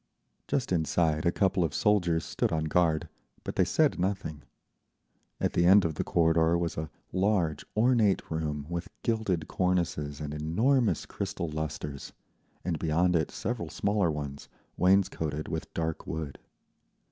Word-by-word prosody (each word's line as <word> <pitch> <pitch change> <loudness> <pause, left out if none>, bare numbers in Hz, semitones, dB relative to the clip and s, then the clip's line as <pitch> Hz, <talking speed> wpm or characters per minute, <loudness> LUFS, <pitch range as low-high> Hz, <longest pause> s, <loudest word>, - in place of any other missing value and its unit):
Just 130 -8 -1
inside 80 -1 +1
a - - +4
couple 95 -1 +2
of 80 -3 -2
soldiers 90 -6 +2
stood - - -1
on 80 -1 0
guard, 80 0 +2 0.4
but - - -5
they - - +4
said - - +2
nothing. 90 -5 -2 1.0
At - - 0
the 85 - +3
end 95 0 +7
of 80 - 0
the - - -2
corridor 80 0 +3
was 85 -1 -2
a 80 0 -4 0.2
large, 95 -5 +1
ornate 110 -6 +3
room 75 -2 -2
with 85 +1 -4 0.2
gilded 105 -9 0
cornices 85 -6 -1
and 75 -1 -5
enormous 110 - +1
crystal 95 -4 -4
lustres, 75 -2 -5 0.5
and 85 -4 -1
beyond 85 +3 +2
it 80 -3 +1
several - - -3
smaller 100 -3 +1
ones, 70 -2 -5 0.3
wainscoted 90 -5 +1
with - - -4
dark 80 -1 -2
wood. 80 -3 -5
85 Hz, 145 wpm, -29 LUFS, 80-95 Hz, 1.0 s, end